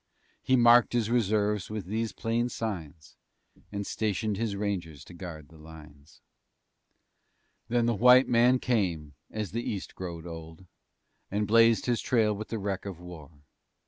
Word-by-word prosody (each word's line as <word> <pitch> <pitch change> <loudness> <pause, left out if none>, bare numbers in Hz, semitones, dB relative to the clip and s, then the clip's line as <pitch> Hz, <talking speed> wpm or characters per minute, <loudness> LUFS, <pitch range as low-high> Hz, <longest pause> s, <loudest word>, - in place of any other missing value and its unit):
He 130 - +2
marked 120 0 +6
His 115 -2 0
reserves 105 -3 +1
with 105 -4 -5
these 110 +4 -2
plain 115 +2 -1
signs 85 -10 -6 0.5
And 100 0 -4
stationed 105 0 -1
His 110 -1 -2
rangers 95 -7 -4
to - - -14
guard 85 -4 -9
the 80 -1 -17
lines. 75 -2 -15 1.5
Then 120 0 +1
the 120 - +2
White 125 +4 +6
Man 125 +2 +4
came, 90 - -1 0.2
as 105 -4 -4
the 115 - -2
East 100 -5 -5
growed 85 -3 -7
old, 80 +1 -9 0.6
And 105 +2 -1
blazed 115 +1 +4
his 120 -2 0
trail 110 -4 +2
with 110 +2 -6
the 115 - -4
wreck 100 -2 -3
of 95 -4 -7
war. 80 -4 -12
105 Hz, 150 wpm, -28 LUFS, 85-115 Hz, 1.5 s, marked